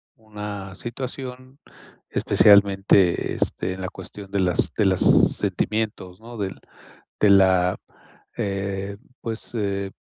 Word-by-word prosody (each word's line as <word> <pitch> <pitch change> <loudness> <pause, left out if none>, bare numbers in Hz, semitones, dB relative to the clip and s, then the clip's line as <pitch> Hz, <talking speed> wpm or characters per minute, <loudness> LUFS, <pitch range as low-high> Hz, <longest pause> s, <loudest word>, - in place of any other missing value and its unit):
una 105 -3 -8
situación, 130 +3 -7 0.5
especialmente, 100 -2 +4
este, 95 - -1
en 95 - -8
la 95 - -3
cuestión 100 -1 -10
de 100 - 0
las 90 -1 +1
de 105 - +3
las 95 -2 +2 0.3
sentimientos, 105 -3 -3
¿no? 115 0 -10
Del 95 -2 -4 0.6
de 105 - +5
la, 95 -2 +4 0.6
eh, 100 0 -3 0.2
pues, 115 +1 -6
eh, 100 -3 -2
100 Hz, 115 wpm, -23 LUFS, 95-110 Hz, 0.6 s, de